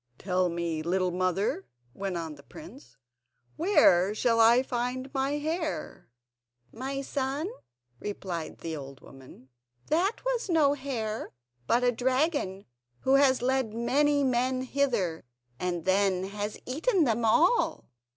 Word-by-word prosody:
"Tell 185 -1 0
me, 170 -2 -2
little 180 +2 0
mother," 185 +2 -1 0.3
went 195 +2 -3
on 165 -2 -5
the 145 - -14
prince, 295 - -13 0.6
"where 210 - +4
shall 230 +1 +2
I 235 +3 +6
find 255 +2 -3
my 270 +1 0
hare?" 310 - -3 0.6
"My 270 +3 -4
son," 275 +4 -2 0.5
replied 185 -5 -5
the 165 -1 -4
old 135 -2 -9
woman, 130 -1 -15 0.4
"that 370 +10 0
was - - -1
no 305 -5 +4
hare, 240 -6 -4 0.3
but 245 +1 +3
a 245 - +4
dragon 255 - 0 0.4
who 265 - +2
has 275 -3 +4
led 260 -4 0
many 285 +5 +2
men 255 0 +1
hither, 240 -12 0 0.4
and 175 -2 -2
then 190 -1 +2
has 205 +1 -4
eaten 330 - +1
them 235 -3 +1
all." 325 - +2
240 Hz, 130 wpm, -28 LUFS, 185-280 Hz, 0.6 s, I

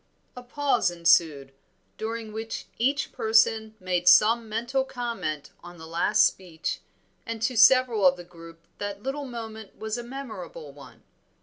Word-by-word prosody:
A 250 - -8
pause 245 -5 0
ensued, 160 -5 +2 0.5
during 225 0 -5
which 225 +1 -5
each 275 +5 0
person 220 0 +2
made 180 -2 -2
some 225 +1 +5
mental 240 +5 -1
comment 195 - -5
on 175 0 -11
the 160 - -11
last 165 +1 +3
speech, 170 -4 -3 0.4
and 230 0 -5
to 255 - 0
several 230 -3 +5
of 180 0 +3
the 175 - -9
group 165 -1 -15
that 205 0 -5
little 275 +2 -4
moment 220 -4 -8
was 220 +2 -4
a - - -6
memorable 225 - -8
one. 140 0 -15
220 Hz, 145 wpm, -26 LUFS, 175-235 Hz, 0.5 s, some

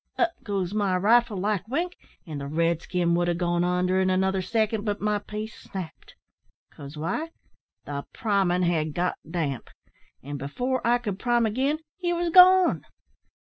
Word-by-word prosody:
Up 345 -1 +2
goes 195 -3 -2
my 200 -3 +1
rifle 220 +2 +3
like 200 0 -1
wink, 340 +9 -2 0.3
and 150 -5 -6
the 140 - -5
red 165 +2 0
skin 175 -2 0
would 175 0 +1
ha' 175 -1 0
gone 175 -1 0
onder 180 +1 +1
in 190 0 +2
another 190 +1 +1
second, 220 +1 0
but 205 -2 -2
my 210 0 0
piece 210 +1 -6
snapped 180 -5 -9 0.6
cause 145 +1 -10
why? 195 - -2 0.6
the 140 -1 -4
primin' 195 -6 +1
had 160 -3 0
got 180 +1 -1
damp; 155 -7 -3 0.5
an' 145 0 -6
afore 250 - -2
I 240 +1 +3
could 205 -5 -5
prime 240 -1 +2
agin, 265 +7 0 0.2
he 350 -1 0
was 345 0 -1
gone. 370 +1 +7
190 Hz, 165 wpm, -26 LUFS, 175-230 Hz, 0.6 s, gone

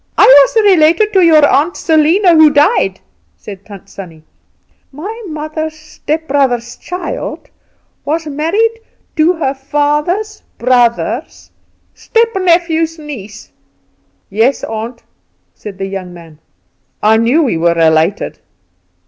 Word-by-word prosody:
"I - - +6
was 285 - +5
related 370 +3 +3
to 380 - +4
your 315 -4 +5
aunt 300 +5 +1
Selena 330 +4 +3
who 315 -1 +6
died," 295 +10 +1 0.4
said 200 -2 -11
Tant 200 -2 -13
Sannie. 170 -6 -12 0.7
"My 400 - -8
mother's 310 0 -5
stepbrother's 285 -6 -2
child 360 +8 -7 0.5
was 320 +2 -2
married 360 +11 -1 0.4
to 320 +3 +3
her 315 -6 -2
father's 295 +9 -2 0.2
brother's 240 -1 -1 0.4
stepnephew's 345 -7 0
niece." 220 -9 -10 0.8
"Yes, 225 +7 +1
aunt," 225 +2 -6 0.5
said 200 -3 -10
the 195 - -4
young 190 -2 -7
man, 165 -3 -15 0.6
"I 220 +1 +4
know 245 +9 +2
we 235 - -1
were 170 +1 +1
related." 160 +3 +1
295 Hz, 110 wpm, -13 LUFS, 225-330 Hz, 0.8 s, I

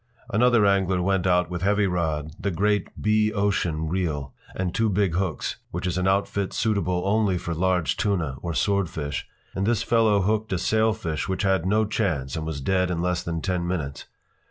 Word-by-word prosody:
Another 120 -1 +4
angler 95 -2 +2
went 95 0 +1
out 90 0 +2
with 90 -1 -3
heavy 100 +2 +2
rod, 80 -5 -1
the 100 - -1
great 105 +3 +1
B 110 0 +2
Ocean 100 -6 0
reel, 75 -6 -2 0.2
and 90 -2 -2
two 110 -1 +1
big 100 -3 +1
hooks 90 -2 -2
(which - - -4
is 90 - -1
an 90 +1 0
outfit 100 0 0
suitable 90 -5 0
only 100 -2 +2
for 85 -1 -4
large 90 0 +1
tuna 85 -10 -1
or 85 -2 -3
swordfish), 85 -8 -1 0.3
and 95 +1 -1
this 115 -2 +1
fellow 110 -4 +3
hooked 110 +2 0
a - - +1
sailfish 110 -5 0
which 95 - -1
had 95 -3 +1
no 110 +3 +3
chance 80 - -1
and 80 -1 -4
was 75 -3 -4
dead 90 +4 +1
in 85 -2 -1
less 90 0 0
than 85 -1 -3
ten 90 -3 -1
minutes. 75 -6 -4
95 Hz, 185 wpm, -25 LUFS, 85-105 Hz, 0.3 s, Another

